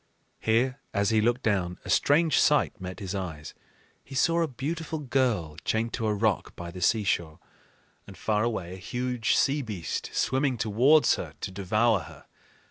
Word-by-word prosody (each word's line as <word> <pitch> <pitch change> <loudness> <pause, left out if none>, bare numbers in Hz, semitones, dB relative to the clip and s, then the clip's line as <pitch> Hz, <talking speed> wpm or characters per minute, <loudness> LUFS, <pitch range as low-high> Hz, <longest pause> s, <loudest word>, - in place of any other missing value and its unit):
Here, 125 +4 +1 0.2
as 100 +1 +2
he 110 -1 +3
looked 120 +3 +1
down, 90 -5 0
a - - -7
strange 155 +3 +3
sight 150 -7 +2
met 95 +1 -6
his 95 -2 -5
eyes: 85 -6 -5 0.5
he 135 - -11
saw 170 +5 +3
a 165 - +1
beautiful 155 +5 -4
girl 120 - 0
chained 115 +1 -1
to 115 -3 -1
a 105 - +1
rock 110 0 0
by 85 0 -7
the 90 +1 -9
seashore, 90 -6 +1 0.7
and 95 - -12
far 105 -1 0
away 95 -7 -2
a - - -8
huge 125 +4 -1
sea 145 +2 +2
beast 105 -9 -4
swimming 130 -1 0
towards 120 +8 +4
her - - -7
to - - -4
devour 105 +3 +2
her. - - -12
110 Hz, 170 wpm, -27 LUFS, 95-130 Hz, 0.7 s, towards